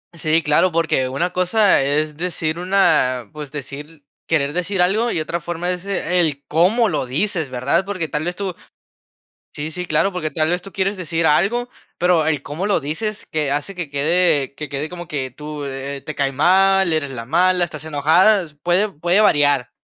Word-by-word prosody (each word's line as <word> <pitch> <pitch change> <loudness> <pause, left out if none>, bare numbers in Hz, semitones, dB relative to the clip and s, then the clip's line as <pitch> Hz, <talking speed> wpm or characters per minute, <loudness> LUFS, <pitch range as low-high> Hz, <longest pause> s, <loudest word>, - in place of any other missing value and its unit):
Sí, 160 0 +1
claro, 150 +5 +3
porque 155 -6 +1
una 170 +7 -2
cosa 185 0 +3
es 150 +2 0
decir 165 -2 -3
una 155 - +2
pues 150 -2 -7
decir 145 +2 -9 0.2
querer 145 -3 +1
decir 180 +3 -2
algo, 215 +6 +1
y 170 - -1
otra 160 +2 -3
forma 175 +1 -3
es 180 +1 -5
el 175 -7 0
cómo 195 +9 +3
lo 155 -8 -2
dices, 160 +3 -1
¿verdad? 130 +8 0
Porque, 185 -4 -3
tal 150 +1 -2
vez 175 +2 -3
tú 195 -1 -4 1.0
sí, 155 +2 -6
sí, 180 +3 -4
claro, 170 +5 +1
porque 170 -4 -3
tal 155 -1 0
vez 175 0 -1
tú 195 - -10
quieres 195 0 -1
decir 165 -2 -1
algo, 215 +11 +2 0.3
pero 175 -2 +3
el 150 -3 0
cómo 160 +7 -4
lo 205 - +2
dices 170 +9 -4
que 150 -3 -2
hace 145 +7 -2
que 175 -5 -5
quede 150 -1 +1
que 150 0 -6
quede 140 +3 -3
como 175 -1 -8
que 130 -4 -4
tú, 150 +2 -7
eh, 135 0 -5
te 155 - -5
cae 140 -1 0
mal, 190 +5 +3
eres 155 -3 -1
la 120 -3 -6
mala, 180 +6 +2
estás 155 -3 -8
enojada, 165 +7 +3 0.2
puede 185 +5 +2
puede 175 +4 +1
variar. 145 - +3
165 Hz, 190 wpm, -20 LUFS, 145-180 Hz, 1.0 s, claro